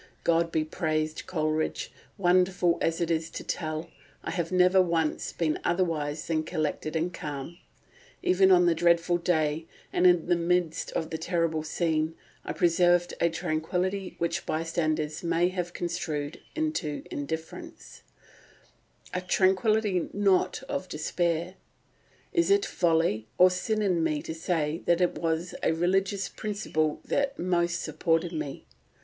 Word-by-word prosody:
God 165 Hz, 0 st, +2 dB
be 155 Hz, -1 st, +1 dB
praised, 155 Hz, -1 st, -2 dB
Coleridge, 155 Hz, -2 st, -1 dB, 0.3 s
wonderful 180 Hz, -1 st, +3 dB
as 165 Hz, 0 st, 0 dB
it 170 Hz, 0 st, 0 dB
is 160 Hz, 0 st, 0 dB
to -, -, -7 dB
tell, 155 Hz, 0 st, -3 dB, 0.4 s
I -, -, -3 dB
have 170 Hz, -1 st, -2 dB
never 185 Hz, +1 st, +5 dB
once 165 Hz, -3 st, 0 dB
been 155 Hz, -3 st, -1 dB
otherwise 160 Hz, -4 st, 0 dB
than 160 Hz, -2 st, 0 dB
collected 155 Hz, -1 st, -3 dB
and 170 Hz, +3 st, 0 dB
calm; 150 Hz, +3 st, -6 dB, 0.6 s
even 190 Hz, +1 st, +4 dB
on 180 Hz, -1 st, +6 dB
the 170 Hz, -, +4 dB
dreadful 170 Hz, +1 st, +3 dB
day, 160 Hz, -2 st, 0 dB, 0.3 s
and 180 Hz, -, +5 dB
in 175 Hz, -2 st, +4 dB
the 175 Hz, -, +3 dB
midst 170 Hz, -1 st, 0 dB
of 160 Hz, -1 st, -2 dB
the 160 Hz, -, -3 dB
terrible 165 Hz, -2 st, 0 dB
scene, 160 Hz, 0 st, -1 dB, 0.3 s
I -, -, -4 dB
preserved 175 Hz, 0 st, +3 dB
a 170 Hz, -, +4 dB
tranquillity 180 Hz, +4 st, -2 dB
which 170 Hz, 0 st, -2 dB
bystanders 155 Hz, -1 st, -1 dB
may 170 Hz, +1 st, +2 dB
have 180 Hz, -2 st, -3 dB
construed 155 Hz, -4 st, -3 dB
into 310 Hz, -, -2 dB
indifference—a 160 Hz, +3 st, -9 dB
tranquillity 190 Hz, +1 st, +2 dB
not 200 Hz, -2 st, +2 dB
of 185 Hz, 0 st, -4 dB
despair. 170 Hz, +3 st, -1 dB, 0.8 s
Is 340 Hz, -1 st, +2 dB
it 400 Hz, 0 st, +4 dB
folly 165 Hz, -, +1 dB
or 180 Hz, 0 st, +7 dB
sin 215 Hz, +4 st, -1 dB
in 180 Hz, -5 st, +2 dB
me 155 Hz, -2 st, 0 dB
to -, -, -5 dB
say 160 Hz, -1 st, -1 dB
that 170 Hz, 0 st, +4 dB
it 180 Hz, -1 st, +2 dB
was 165 Hz, +1 st, -1 dB
a -, -, +2 dB
religious 190 Hz, +4 st, +1 dB
principle 200 Hz, -8 st, -2 dB
that 280 Hz, 0 st, 0 dB
most 175 Hz, -1 st, 0 dB
supported 165 Hz, +2 st, 0 dB
me?... 150 Hz, -3 st, -5 dB
170 Hz, 140 wpm, -28 LUFS, 160-180 Hz, 0.8 s, or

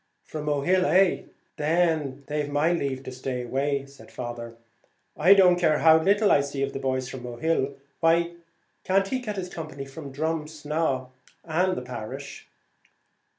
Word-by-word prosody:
"From 155 Hz, -1 st, -6 dB
Mohill, 150 Hz, +6 st, +2 dB
eh? 185 Hz, +4 st, +3 dB, 0.3 s
then 155 Hz, -3 st, +1 dB
they've 150 Hz, 0 st, -2 dB
my 150 Hz, +4 st, +2 dB
leave 135 Hz, -5 st, -2 dB
to 130 Hz, -, -7 dB
stay 130 Hz, -1 st, -4 dB
away; 140 Hz, +3 st, -1 dB, 1.3 s
I 175 Hz, +6 st, +7 dB
don't 180 Hz, -2 st, +6 dB
care 155 Hz, -3 st, +3 dB
how 160 Hz, 0 st, +6 dB
little 205 Hz, +4 st, +3 dB
I 140 Hz, -, +5 dB
see 140 Hz, -1 st, -3 dB
of 140 Hz, -, -2 dB
the -, -, -4 dB
boys 130 Hz, -1 st, -1 dB
from 130 Hz, -1 st, -7 dB
Mohill. 135 Hz, +3 st, -1 dB, 0.2 s
Why 170 Hz, +1 st, +3 dB, 0.5 s
can't 195 Hz, +1 st, +2 dB
he 260 Hz, -, -1 dB
get 215 Hz, -5 st, -5 dB
his 190 Hz, -2 st, -4 dB
company 155 Hz, -4 st, -6 dB
from 140 Hz, +1 st, -9 dB
Drumsna 150 Hz, -2 st, -2 dB, 0.4 s
and 180 Hz, +3 st, +1 dB
the -, -, -4 dB
parish?" 125 Hz, +3 st, -7 dB
150 Hz, 150 wpm, -26 LUFS, 135-170 Hz, 1.3 s, I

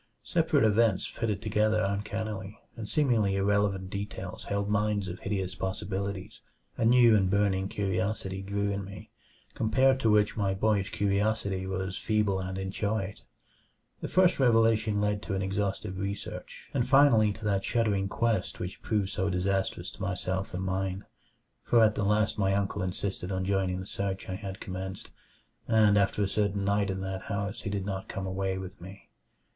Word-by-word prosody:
Separate -, -, +2 dB
events 110 Hz, -2 st, +3 dB
fitted 110 Hz, -3 st, -3 dB
together 110 Hz, 0 st, +2 dB
uncannily, 105 Hz, 0 st, -3 dB, 0.2 s
and 110 Hz, -3 st, -6 dB
seemingly 115 Hz, -10 st, +2 dB
irrelevant 100 Hz, -1 st, +1 dB
details 100 Hz, +1 st, -5 dB
held 100 Hz, 0 st, -1 dB
mines 105 Hz, -1 st, +1 dB
of 90 Hz, 0 st, -6 dB
hideous 95 Hz, -2 st, -2 dB
possibilities. 100 Hz, +2 st, -4 dB, 0.3 s
A 115 Hz, -, 0 dB
new 120 Hz, -1 st, +6 dB
and 95 Hz, -3 st, +3 dB
burning 95 Hz, -1 st, +2 dB
curiosity 95 Hz, 0 st, -2 dB
grew 100 Hz, +1 st, -1 dB
in 100 Hz, 0 st, -2 dB
me, 95 Hz, -1 st, -10 dB, 0.4 s
compared 130 Hz, +4 st, +3 dB
to 115 Hz, -, +2 dB
which 105 Hz, -1 st, +3 dB
my 100 Hz, -3 st, 0 dB
boyish 100 Hz, -1 st, +1 dB
curiosity 100 Hz, -2 st, 0 dB
was 95 Hz, 0 st, -3 dB
feeble 105 Hz, -3 st, +1 dB
and 95 Hz, 0 st, -4 dB
inchoate. 100 Hz, +1 st, -2 dB, 0.8 s
The -, -, -4 dB
first 185 Hz, -1 st, +3 dB
revelation 115 Hz, -4 st, +3 dB
led 105 Hz, 0 st, 0 dB
to 100 Hz, -, -3 dB
an 95 Hz, -, -1 dB
exhaustive 95 Hz, -1 st, -2 dB
research, 100 Hz, +1 st, -6 dB
and 125 Hz, -2 st, 0 dB
finally 130 Hz, -6 st, +6 dB
to 110 Hz, +1 st, -9 dB
that 100 Hz, -2 st, +1 dB
shuddering 105 Hz, -5 st, +1 dB
quest 115 Hz, -3 st, 0 dB
which 90 Hz, +1 st, -5 dB
proved 105 Hz, -4 st, 0 dB
so 95 Hz, 0 st, -1 dB
disastrous 95 Hz, +1 st, -1 dB
to -, -, -13 dB
myself 95 Hz, +1 st, -2 dB
and 95 Hz, -, -3 dB
mine. 95 Hz, 0 st, -2 dB, 0.6 s
For 115 Hz, -2 st, +4 dB
at 110 Hz, -1 st, +5 dB
the 105 Hz, -, -2 dB
last 105 Hz, +1 st, +1 dB
my 95 Hz, -1 st, +2 dB
uncle 100 Hz, 0 st, -1 dB
insisted 95 Hz, 0 st, -3 dB
on 95 Hz, 0 st, -1 dB
joining 95 Hz, -1 st, 0 dB
the 95 Hz, -, -6 dB
search 95 Hz, -1 st, -3 dB
I -, -, -2 dB
had 95 Hz, +1 st, -6 dB
commenced, 95 Hz, +1 st, -6 dB, 0.6 s
and 110 Hz, -3 st, +5 dB
after 100 Hz, 0 st, +2 dB
a -, -, +1 dB
certain 100 Hz, -1 st, 0 dB
night 100 Hz, 0 st, +1 dB
in 95 Hz, 0 st, -2 dB
that 95 Hz, 0 st, -4 dB
house 100 Hz, +3 st, -3 dB
he 105 Hz, -, -4 dB
did 100 Hz, -1 st, -2 dB
not 95 Hz, -2 st, -4 dB
come 95 Hz, -, -4 dB
away 95 Hz, 0 st, -1 dB
with 95 Hz, 0 st, -8 dB
me. 95 Hz, +3 st, -12 dB
100 Hz, 170 wpm, -29 LUFS, 95-105 Hz, 0.8 s, new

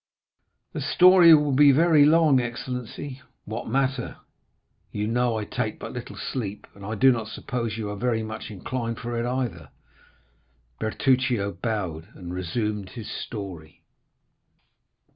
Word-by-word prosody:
"The -, -, -4 dB
story 180 Hz, -2 st, +7 dB
will 150 Hz, -1 st, +2 dB
be 140 Hz, +1 st, +6 dB
very 155 Hz, 0 st, +5 dB
long, 155 Hz, -3 st, +5 dB
excellency." 125 Hz, +2 st, -5 dB, 0.2 s
"What 110 Hz, +2 st, -5 dB
matter? 135 Hz, +1 st, -1 dB, 0.8 s
you 105 Hz, -, -2 dB
know 120 Hz, +1 st, +1 dB
I 105 Hz, -, -3 dB
take -, -, -3 dB
but -, -, -8 dB
little -, -, -7 dB
sleep, 105 Hz, -5 st, -5 dB
and 100 Hz, -, -14 dB
I 110 Hz, +3 st, -4 dB
do 130 Hz, +5 st, +5 dB
not 115 Hz, -3 st, -2 dB
suppose 115 Hz, -1 st, -4 dB
you 110 Hz, -2 st, -3 dB
are -, -, -4 dB
very 115 Hz, 0 st, -1 dB
much 110 Hz, 0 st, -6 dB
inclined 115 Hz, +3 st, -4 dB
for 120 Hz, -1 st, -5 dB
it 120 Hz, -, -1 dB
either." 120 Hz, -10 st, -3 dB, 1.1 s
Bertuccio 120 Hz, -2 st, +1 dB
bowed, 95 Hz, -9 st, -4 dB
and 90 Hz, -1 st, -8 dB
resumed 100 Hz, +2 st, -3 dB
his 110 Hz, +2 st, -8 dB
story. 90 Hz, -8 st, -7 dB
115 Hz, 140 wpm, -25 LUFS, 105-130 Hz, 1.1 s, story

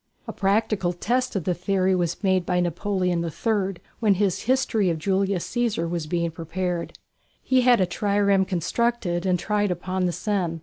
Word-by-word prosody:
A -, -, -5 dB
practical 200 Hz, -2 st, +1 dB
test 250 Hz, +7 st, -1 dB
of 190 Hz, -, -1 dB
the 180 Hz, -, 0 dB
theory 185 Hz, +1 st, +1 dB
was 175 Hz, +1 st, -1 dB
made 190 Hz, -2 st, +2 dB
by 180 Hz, 0 st, 0 dB
Napoleon 180 Hz, 0 st, 0 dB
III 195 Hz, +3 st, -1 dB, 0.2 s
when 210 Hz, -4 st, +3 dB
his 195 Hz, -2 st, 0 dB
"History 230 Hz, -7 st, +2 dB
of 165 Hz, -, 0 dB
Julius 190 Hz, +1 st, 0 dB
Cæsar" 230 Hz, -8 st, -1 dB
was 165 Hz, -2 st, -3 dB
being 170 Hz, 0 st, -1 dB
prepared. 170 Hz, +2 st, -4 dB, 0.5 s
He 260 Hz, -1 st, +3 dB
had 245 Hz, -1 st, +5 dB
a 185 Hz, -, +4 dB
trireme 200 Hz, +1 st, +2 dB
constructed 190 Hz, 0 st, -1 dB
and 180 Hz, -1 st, +3 dB
tried 205 Hz, +2 st, 0 dB
upon 185 Hz, +1 st, -1 dB
the -, -, 0 dB
Seine. 175 Hz, -4 st, -2 dB
190 Hz, 170 wpm, -24 LUFS, 175-205 Hz, 0.5 s, had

